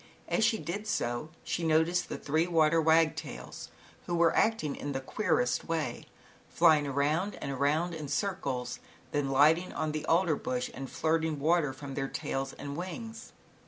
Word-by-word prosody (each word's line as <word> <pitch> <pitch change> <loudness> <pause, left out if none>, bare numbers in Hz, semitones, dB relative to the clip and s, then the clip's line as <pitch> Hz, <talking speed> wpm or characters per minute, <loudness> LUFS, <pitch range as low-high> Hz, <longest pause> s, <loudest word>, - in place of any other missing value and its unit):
As - - +1
she 220 +1 +3
did 205 +3 -5
so, 120 - -1
she 170 - -2
noticed 160 +2 +2
the - - -4
three 155 +4 0
water 165 -1 +3
wagtails, 160 0 0 0.4
who 175 - -1
were 170 -1 +3
acting 220 -10 +1
in 145 - -4
the 135 - -1
queerest 130 - 0
way, 160 -7 -2 0.4
flying 155 -4 +4
around 150 +8 0
and 140 - -4
around 150 +6 +1
in 155 -3 -5
circles, 135 -10 -2 0.3
then 145 -2 0
lighting 155 +6 +4
on 155 - -2
the 155 0 -3
alder 165 -1 +3
bush, 125 -2 -3
and 135 0 -6
flirting 160 -1 0
water 155 -1 +2
from 135 +1 -8
their 135 0 -2
tails 135 0 -3
and 140 0 -7
wings. 225 +7 -7
155 Hz, 160 wpm, -30 LUFS, 140-170 Hz, 0.4 s, flying